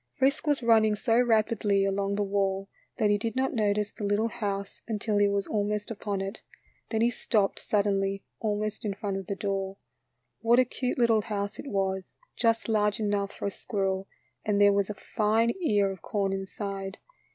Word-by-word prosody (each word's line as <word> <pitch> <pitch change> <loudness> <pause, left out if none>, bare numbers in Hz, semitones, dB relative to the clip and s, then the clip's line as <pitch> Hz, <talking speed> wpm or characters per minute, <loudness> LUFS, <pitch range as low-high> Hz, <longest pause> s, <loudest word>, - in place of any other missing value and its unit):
Frisk 275 +2 +2
was 290 -4 +2
running 220 -2 +5
so 230 +3 +3
rapidly 215 -4 +2
along 195 0 0
the 205 - +1
wall 195 -1 0 0.3
that 210 -2 +3
he 205 - +2
did 225 +3 -2
not 265 +1 +1
notice 210 -2 +1
the - - -8
little 205 +3 +1
house 200 -4 -4
until 215 -1 0
he 205 - +5
was 200 -1 0
almost 210 0 -1
upon 205 -2 -3
it. 195 +2 -5 0.5
Then 220 -1 0
he 235 +1 +4
stopped 210 -4 0
sud 210 -1 +1
denly, 195 -1 0 0.2
almost 215 -1 -2
in 205 -3 -2
front 200 -1 -3
of 195 -2 -6
the 200 - -2
door. 195 -1 -2 0.6
What 235 +1 +4
a 255 - +6
cute 250 0 -3
little 230 -3 +4
house 200 -1 -3
it - - -7
was, 190 -3 -2 0.2
just 230 -1 +1
large 210 -2 +2
enough 205 -2 0
for - - -6
a 200 - 0
squirrel, 195 -1 -2 0.4
and 205 -1 +1
there 205 0 +6
was 200 0 +1
a 210 - -4
fine 220 +2 +1
ear 205 - +2
of 190 -3 -9
corn 195 0 -1
inside. 195 0 -4
205 Hz, 190 wpm, -28 LUFS, 195-220 Hz, 0.6 s, a